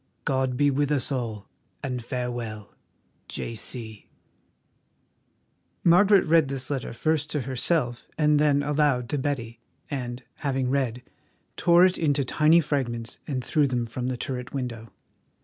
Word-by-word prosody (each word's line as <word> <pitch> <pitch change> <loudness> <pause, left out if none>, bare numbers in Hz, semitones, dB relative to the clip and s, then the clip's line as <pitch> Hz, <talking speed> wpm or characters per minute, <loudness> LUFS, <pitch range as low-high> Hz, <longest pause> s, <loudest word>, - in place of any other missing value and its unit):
God 130 -2 0
be 145 +1 +4
with 145 +1 0
us 145 -1 +1
all, 115 -6 -3 0.4
and 125 -3 -3
farewell. 120 -4 -4 0.5
"J.C." 110 -1 -6 1.7
Margaret 195 +3 +6
read 160 -2 +4
this 135 0 -3
letter 135 -4 -3
first 150 +4 0
to 150 - 0
herself 130 0 -1
and 150 -1 +4
then 145 -1 +3
aloud 145 -4 +1
to 145 - -1
Betty, 120 -5 -3 0.3
and, 125 -2 -4
having 135 -3 -1
read, 125 -3 -1 0.5
tore 175 +1 +6
it 185 0 +1
into 145 -4 +1
tiny 155 +6 +4
fragments 120 -6 -3
and 130 -4 -3
threw 150 -2 +2
them 125 -2 -1
from 120 +2 -4
the 130 -1 -2
turret 125 0 -4
window. 120 -4 -5
130 Hz, 135 wpm, -26 LUFS, 120-150 Hz, 1.7 s, Margaret